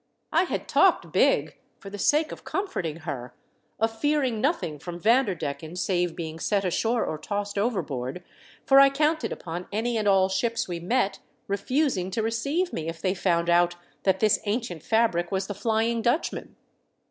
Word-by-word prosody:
I 335 +3 +3
had - - -4
talked - - +3
big, - - +2 0.2
for 195 - -10
the 205 - -7
sake 305 +7 +2
of - - -9
comforting 175 - -3
her, 135 -6 -6 0.4
of 225 +1 -1
fearing 280 -7 +1
nothing 265 - -1
from 175 +3 -7
Vanderdecken 180 - 0
save 180 -2 0
being 160 -1 -6
set 200 +2 0
ashore 225 +6 +1
or 155 - -4
tossed 205 +2 -3
overboard, 180 - -2 0.4
for 270 0 +7
I 275 0 +8
counted 300 +3 0
upon 175 +1 -6
any 225 +3 -1
and 210 - -1
all 190 -1 +5
ships 230 +5 -1
we 175 -2 -4
met 195 +2 0 0.3
refusing 200 - 0
to 220 +4 -2
receive 280 +11 -1
me 160 -1 -3
if 165 0 -7
they 185 +2 0
found 170 -3 +1
out 175 0 +3 0.3
that 190 +3 +1
this 215 -1 +4
ancient 205 -6 -2
fabric 220 -6 +1
was 190 0 0
the 205 - -4
Flying 225 +2 0
Dutchman. 240 +8 -1
200 Hz, 170 wpm, -26 LUFS, 175-235 Hz, 0.4 s, I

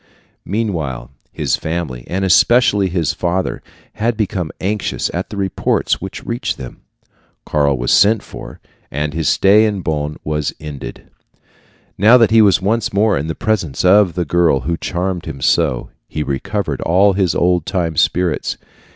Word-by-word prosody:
Meanwhile 80 - -3 0.2
his - - -1
family, 80 -7 -4
and 95 +2 -1
especially 105 0 +4
his 85 -4 -1
father, 90 +2 -2 0.3
had 115 +1 -1
become 100 -6 -2
anxious 105 +2 -2
at - - -3
the 105 - -7
reports 95 -1 0
which - - -7
reached 120 +3 -3
them. 65 -2 -10 0.6
Karl 70 -3 +1
was - - -1
sent 105 +2 +4
for, - - -10 0.3
and 75 +1 -3
his 80 -2 0
stay 105 +3 +5
at 100 -4 -3
Bonn 75 -1 -2
was 75 -1 -2
ended. 75 -3 -9 0.9
Now 110 +6 +7
that 115 -3 +3
he 110 0 +6
was 100 -3 +4
once 110 +3 0
more 105 +1 +2
in 70 +3 -2
the 80 - -3
presence 90 -9 -1
of 95 -2 +5
the 90 -1 -1
girl 85 -4 +2
who 85 +5 -2
charmed 90 +1 -3
him - - -6
so, 75 -8 +1 0.2
he 75 - -3
recovered 80 +2 -3
all 95 +4 +3
his 95 -2 0
old 90 -2 +1
time 90 -4 -1
spirits. 90 +2 0
90 Hz, 160 wpm, -17 LUFS, 75-100 Hz, 0.9 s, Now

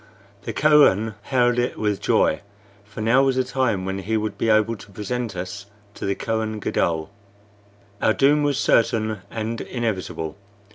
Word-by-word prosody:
The - - -2
Kohen 140 -8 +4
hailed 120 0 +2
it 120 - -1
with 105 -2 -1
joy, 80 - +2 0.4
for 105 +1 -9
now 115 +5 +4
was 135 -1 +2
the 130 - +2
time 125 -7 -1
when 95 0 -3
he 110 +4 -1
would 105 -1 -3
be 115 - -1
able 110 +1 +3
to 100 - -14
present 110 +2 -4
us 95 +3 -6 0.3
to - - -5
the 100 - 0
Kohen 110 -1 -2
Gadol. 85 -3 -1 0.9
Our 110 - +3
doom 145 +2 +4
was 145 -2 +1
certain 110 -4 +2
and 115 +1 -4
inevitable. 100 -8 -3
110 Hz, 160 wpm, -23 LUFS, 100-125 Hz, 0.9 s, Kohen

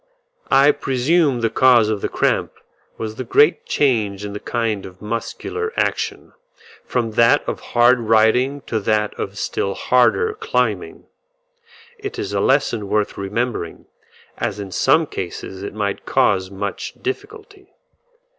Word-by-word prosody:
I 140 +2 +6
presume 135 0 +1
the 115 -1 +1
cause 125 -4 +5
of 105 -2 -2
the - - -2
cramp - - 0 0.4
was 110 0 -5
the 130 - -3
great 150 +7 +3
change 105 -8 0
in 100 - -6
the 105 - -5
kind 115 -4 -2
of 90 0 -11
muscular 115 - -4
action, - - -2 0.5
from 120 -3 -2
that 115 +6 +3
of - - -3
hard 120 +1 +3
riding 115 +5 +2
to 115 -4 -2
that 105 0 0
of - - -4
still 100 0 -2
harder 430 - +2
climbing. 445 +1 -2 0.9
It 410 0 -6
is 395 0 -4
a - - +1
lesson 125 -6 +1
worth 105 -1 0
remembering, 100 -2 -3 0.5
as - - -2
in 100 -2 -6
some 160 - +3
cases 95 - -6
it 100 +1 -6
might 100 -2 -3
cause 95 -2 +2
much 100 0 -5
difficulty. 400 0 -7
115 Hz, 140 wpm, -20 LUFS, 105-145 Hz, 0.9 s, I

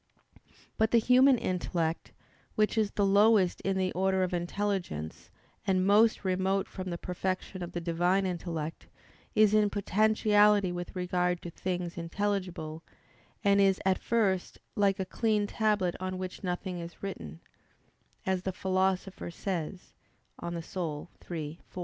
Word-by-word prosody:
But 220 0 +3
the 235 - +4
human 255 +3 +5
intellect, 170 -4 -2 0.4
which 215 +1 +2
is 215 -2 +2
the 205 - 0
lowest 200 -1 +4
in 195 0 0
the 185 -1 0
order 190 0 +1
of 185 - -2
intelligence 175 - -3 0.4
and 185 -1 +2
most 210 +1 +4
remote 190 +1 +1
from 185 -1 -6
the 170 - -3
perfection 185 +1 -3
of 175 0 -6
the 175 - -3
Divine 175 +3 +1
intellect, 165 -3 -4 0.5
is 215 -1 +5
in 210 -1 +4
potentiality 210 -1 +3
with 175 +1 -6
regard 180 -1 0
to 175 - -6
things 175 -1 -3
intelligible, 175 -3 -3 0.6
and 200 -1 +4
is 195 -1 +4
at 190 -1 +3
first 200 -6 0 0.2
"like 200 -1 +2
a 190 - -1
clean 215 +1 +1
tablet 205 -4 +1
on 185 0 -3
which 185 +1 -6
nothing 180 0 -3
is 170 +2 -9
written," 80 - -6 0.9
as 190 -1 0
the 190 - -2
Philosopher 190 0 -1
says 180 0 -5 0.5
(De - - -6
Anima 170 -1 -4 0.7
iii, 160 -2 -5
4). - - -8
185 Hz, 145 wpm, -30 LUFS, 175-205 Hz, 0.9 s, human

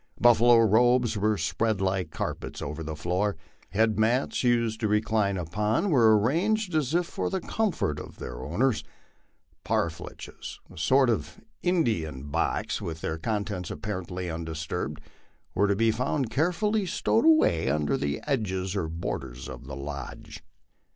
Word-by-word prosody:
Buffalo 120 0 +6
robes 120 +2 +4
were 105 +1 +1
spread 110 -1 0
like 95 -3 0
carpets - - -4
over 75 +3 -5
the 80 -1 -4
floor; 90 +4 -1 0.3
head 110 +1 +2
mats, 120 +6 +1
used 115 -2 +2
to 110 - 0
recline 105 -1 +1
upon, 105 - 0
were 120 -6 +5
ar 110 - +6
ranged 180 - +1
as 155 -1 +1
if 175 0 +2
for - - -3
the 190 - -1
comfort 175 - -1
of - - -10
their - - -7
owners; 110 - +1 0.8
parfleches, 85 -2 -4
a - - -14
sort 130 - +4
of 75 -8 -3 0.2
Indian 110 - 0
band 70 +1 -9
box, - - -1
with 80 -1 -5
their 80 - -3
contents 100 -2 -2
apparently 90 +1 -4
undisturbed, 80 -1 -4 0.5
were 100 - +3
to 100 - +2
be 115 +2 +3
found 125 +1 -1
carefully 185 - +1
stowed 225 +6 +1
away 310 - +4
under 75 +1 +1
the 70 0 -2
edges 95 -8 -1
or 90 -5 -1
borders 65 -6 -5
of 65 0 -9
the 65 - -6
lodge. 75 +3 -7
105 Hz, 150 wpm, -27 LUFS, 80-120 Hz, 0.8 s, Buffalo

